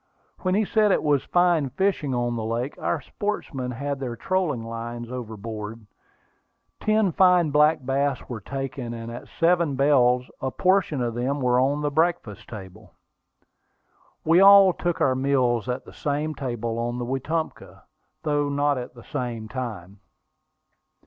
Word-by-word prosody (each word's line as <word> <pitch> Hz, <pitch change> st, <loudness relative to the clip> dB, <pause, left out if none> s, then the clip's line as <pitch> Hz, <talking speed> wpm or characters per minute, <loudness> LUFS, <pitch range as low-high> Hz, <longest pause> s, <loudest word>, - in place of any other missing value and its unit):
When 185 Hz, 0 st, 0 dB
he 215 Hz, +1 st, +2 dB
said 215 Hz, 0 st, +3 dB
it -, -, +2 dB
was 145 Hz, -3 st, +2 dB
fine 175 Hz, -5 st, +2 dB
fishing 170 Hz, -1 st, 0 dB
in 120 Hz, -1 st, -1 dB
the 115 Hz, -, -3 dB
lake, 115 Hz, +5 st, -2 dB
our -, -, -1 dB
sportsmen 150 Hz, -11 st, -4 dB
had 140 Hz, +3 st, -3 dB
their 125 Hz, -3 st, -4 dB
trolling 165 Hz, -, -1 dB
lines 115 Hz, +1 st, -6 dB
overboard. 110 Hz, -2 st, -6 dB, 0.9 s
Ten 215 Hz, -3 st, +2 dB
fine 180 Hz, -2 st, +4 dB
black 150 Hz, -1 st, +3 dB
bass 135 Hz, +1 st, 0 dB
were 115 Hz, -4 st, -6 dB
taken; 135 Hz, 0 st, -5 dB
and 115 Hz, 0 st, -7 dB
at 120 Hz, -, -8 dB
"seven 170 Hz, -4 st, +3 dB
bells," 125 Hz, -3 st, +3 dB
a 130 Hz, -, -1 dB
portion 180 Hz, -4 st, +1 dB
of 120 Hz, -1 st, -2 dB
them 130 Hz, +5 st, -1 dB
were 125 Hz, -1 st, +2 dB
on 140 Hz, +3 st, +1 dB
the 145 Hz, -, 0 dB
breakfast 150 Hz, -, -1 dB
table. 95 Hz, -5 st, -11 dB, 1.3 s
We 165 Hz, +2 st, +5 dB
all 195 Hz, -1 st, +8 dB
took 175 Hz, -1 st, -2 dB
our 130 Hz, -, +4 dB
meals 130 Hz, -3 st, +1 dB
at 125 Hz, +1 st, -3 dB
the -, -, -13 dB
same 150 Hz, +2 st, -2 dB
table 120 Hz, -4 st, -3 dB
on 120 Hz, +1 st, -2 dB
the 120 Hz, -, -3 dB
Wetumpka, 145 Hz, +6 st, -4 dB, 0.4 s
though 145 Hz, -2 st, 0 dB
not 145 Hz, -1 st, +1 dB
at 125 Hz, 0 st, -8 dB
the 120 Hz, -, -13 dB
same 120 Hz, -5 st, -4 dB
time. 105 Hz, -6 st, -6 dB
135 Hz, 155 wpm, -24 LUFS, 120-155 Hz, 1.3 s, all